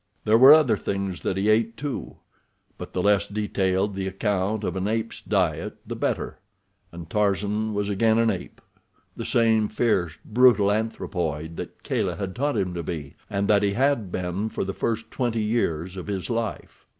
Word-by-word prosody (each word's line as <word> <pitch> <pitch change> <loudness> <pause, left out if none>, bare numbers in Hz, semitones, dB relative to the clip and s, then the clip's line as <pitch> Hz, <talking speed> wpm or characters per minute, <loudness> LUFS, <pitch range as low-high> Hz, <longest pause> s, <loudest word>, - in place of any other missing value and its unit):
There 110 +1 +5
were 130 +3 +10
other 150 -9 +6
things 95 -2 -3
that 95 - -1
he 100 +2 0
ate, 115 +1 +2
too, 145 -1 -5 0.6
but - - -7
the 90 - -1
less 100 0 +3
detailed 100 -1 0
the 95 0 -3
account 100 +2 -1
of - - -2
an 95 +1 -1
ape's 110 +1 -2
diet, 90 -7 0
the - - -5
better—and 85 -1 -6
Tarzan 105 +2 0
was 100 0 -1
again 110 +2 +2
an 115 -1 +3
ape, 95 - -7 0.5
the - - -5
same 110 -2 +3
fierce, 95 -8 0
brutal 115 -3 +5
anthropoid 85 -7 -2
that - - -8
Kala - - -1
had 95 -2 -5
taught 145 +3 0
him 90 -2 -1
to 85 - -3
be, 75 -4 -6
and 100 0 -1
that 105 -1 +4
he 100 -1 +1
had 125 -5 +1
been 90 +4 -2
for - - -3
the 95 - -3
first 115 +2 -2
twenty 115 -4 -1
years 95 -6 -1
of 95 - -7
his 100 +2 -3
life. 115 -1 -4
105 Hz, 175 wpm, -25 LUFS, 95-110 Hz, 0.6 s, were